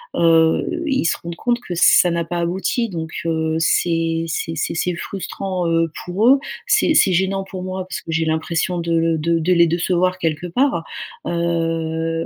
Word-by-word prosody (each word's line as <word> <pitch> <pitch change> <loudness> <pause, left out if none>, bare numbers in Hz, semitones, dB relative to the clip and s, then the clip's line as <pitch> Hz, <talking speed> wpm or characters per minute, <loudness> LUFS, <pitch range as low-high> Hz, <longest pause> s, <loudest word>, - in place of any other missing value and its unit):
Heu, 165 - +3
ils 270 - 0
se - - +1
rendent 170 0 -6
compte 240 +6 0
que 180 - -6
ça 175 +1 +5
n'a 170 0 0
pas 175 +1 -3
abouti 190 +7 -1
donc, 160 -4 -5 0.2
heu, 160 -1 0
c'est 165 0 +1
c'est 165 0 -3
c'est 155 - -2
c'est 180 +1 -1
frustrant, 190 -1 -4
heu, 165 -1 +1
pour 190 +6 +1
eux. 275 +1 +6 0.3
C'est 330 -9 +3
c'est 190 - +4
gênant 190 +2 0
pour 190 -1 -8
moi 185 0 -4
parce - - -5
que 165 - -7
j'ai 165 0 0
l'impression 165 +3 -1
de 170 0 -3
l 165 -1 +1
de 165 +1 +1
de 175 +3 +2
les 170 -1 +5
décevoir 180 +2 0
quelque 165 0 -2
part. 245 -2 +1 0.4
Heu, 165 -1 -1
170 Hz, 185 wpm, -20 LUFS, 165-185 Hz, 0.4 s, eux